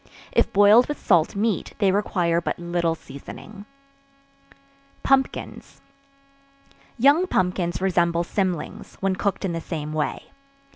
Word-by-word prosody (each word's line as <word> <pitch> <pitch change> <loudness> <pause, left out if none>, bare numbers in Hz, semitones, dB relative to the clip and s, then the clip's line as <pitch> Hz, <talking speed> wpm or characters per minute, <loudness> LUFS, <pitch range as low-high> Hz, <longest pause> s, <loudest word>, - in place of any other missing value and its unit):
If - - +2
boiled 205 +5 +6
with 295 - -4
salt 170 -3 +2
meat, 210 0 -1
they 195 -2 +3
require 175 -4 0
but - - -3
little 170 -1 -1
seasoning. 205 +8 -11 1.4
Pumpkins. 270 -1 -1 1.2
Young 285 +9 +4
pumpkins 180 - 0
resemble 170 -2 +1
cymlings, 180 -2 -3
when 195 -1 0
cooked 200 +1 -2
in 180 - -2
the 165 - -3
same 155 -2 -5
way. 155 -1 -3
185 Hz, 115 wpm, -23 LUFS, 170-205 Hz, 1.4 s, boiled